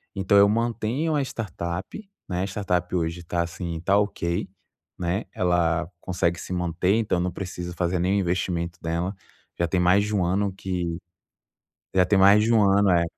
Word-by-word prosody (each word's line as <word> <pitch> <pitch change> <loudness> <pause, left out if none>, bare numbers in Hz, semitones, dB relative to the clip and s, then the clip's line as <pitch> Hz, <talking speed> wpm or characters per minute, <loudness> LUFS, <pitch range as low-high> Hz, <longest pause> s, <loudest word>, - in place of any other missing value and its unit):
Então, 100 +1 +3
eu 100 0 +7
mantenho 115 +7 0
uma 145 - +2
startup, 95 - -5 0.2
né? 90 -1 -1
A - - -2
startup 90 -3 -2
hoje 85 0 -2
tá 85 +1 -1
assim, 85 -1 -5
tá 100 +3 +3
ok, 95 -2 -1 0.5
né? 90 +4 -1
Ela 85 -1 +1
consegue 85 -2 -1
se - - -8
manter, 90 +2 +1
então 105 -5 +1
não 90 0 -1
precisa 90 -1 -6
fazer 90 +1 -1
nenhum 95 +3 +2
investimento 85 -2 -1
dela. 85 +4 -2 0.4
Já 85 - +2
tem 90 - 0
mais 90 +3 +4
de 105 - -4
um 95 -3 +2
ano 100 +3 +1
que 90 -3 -3 1.0
já 90 -1 +5
tem 95 +2 +3
mais 100 +2 +7
de 115 - +2
um 110 -2 +5
ano, 100 0 +4
é 85 -1 +4
90 Hz, 180 wpm, -25 LUFS, 85-100 Hz, 1.0 s, eu